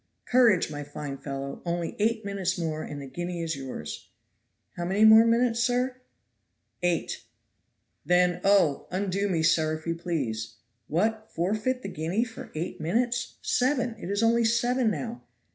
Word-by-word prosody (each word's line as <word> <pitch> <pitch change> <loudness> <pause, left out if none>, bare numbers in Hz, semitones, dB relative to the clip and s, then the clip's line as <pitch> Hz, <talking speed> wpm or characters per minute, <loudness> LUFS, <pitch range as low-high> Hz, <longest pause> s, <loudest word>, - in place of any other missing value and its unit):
"Courage, 235 -10 +4
my 145 0 -5
fine 145 -1 -6
fellow, 140 -1 -5
only 170 -1 -2
eight 220 0 +1
minutes 195 -2 -1
more 160 -2 -2
and 145 - -6
the 140 - -7
guinea 175 +5 -4
is 165 -2 -2
yours. 130 - -7 0.7
"How 175 - -4
many 195 +5 +3
more 220 +1 +8
minutes, 235 0 +2
sir?" 250 +1 +1 0.8
"Eight." 175 -2 -1 0.8
"Then, 180 +2 +3
oh! 195 -8 +3
undo 195 +2 -1
me, 165 -4 +1
sir, 155 -1 +3
if 155 - -16
you 165 - 0
please." 130 -11 -3 0.3
"What! 220 +7 0
forfeit 215 +9 -1
the - - -4
guinea 175 +6 -1
for 230 -2 -9
eight 160 0 -4
minutes 240 +9 0
seven, 250 -2 +1
it 180 - -6
is 200 +2 0
only 230 +1 +4
seven 240 +1 +2
now." 140 - -4
180 Hz, 155 wpm, -27 LUFS, 160-225 Hz, 0.8 s, more